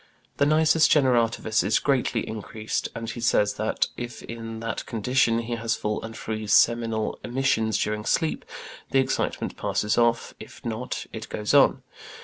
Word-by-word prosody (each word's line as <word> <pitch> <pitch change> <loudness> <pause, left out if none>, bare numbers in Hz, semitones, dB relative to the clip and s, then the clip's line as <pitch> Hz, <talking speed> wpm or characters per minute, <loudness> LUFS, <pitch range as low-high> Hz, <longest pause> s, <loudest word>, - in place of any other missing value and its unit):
The 140 - +3
nisus 155 +1 +4
generativus 115 -5 +2
is 110 - +2
greatly 130 -4 0
increased, 110 0 -4
and 115 0 -5
he 120 +1 -5
says 105 -3 +2
that, 110 - +1
if 120 -1 -6
in 115 -1 -7
that 115 0 -4
condition, 115 +1 +1
he 120 +1 -4
has 115 -1 -1
full 105 0 -2
and 115 0 -8
free 110 -1 -4
seminal 115 0 +2
emissions 120 -4 +1
during 105 +1 -2
sleep, 160 +5 0 0.5
the - - +1
excitement 130 - -1
passes 105 +2 0
off; 115 0 +1
if - - -12
not, 115 +2 -4
it 110 -1 -7
goes 105 0 -2
on. - - +5
115 Hz, 155 wpm, -25 LUFS, 110-120 Hz, 0.5 s, on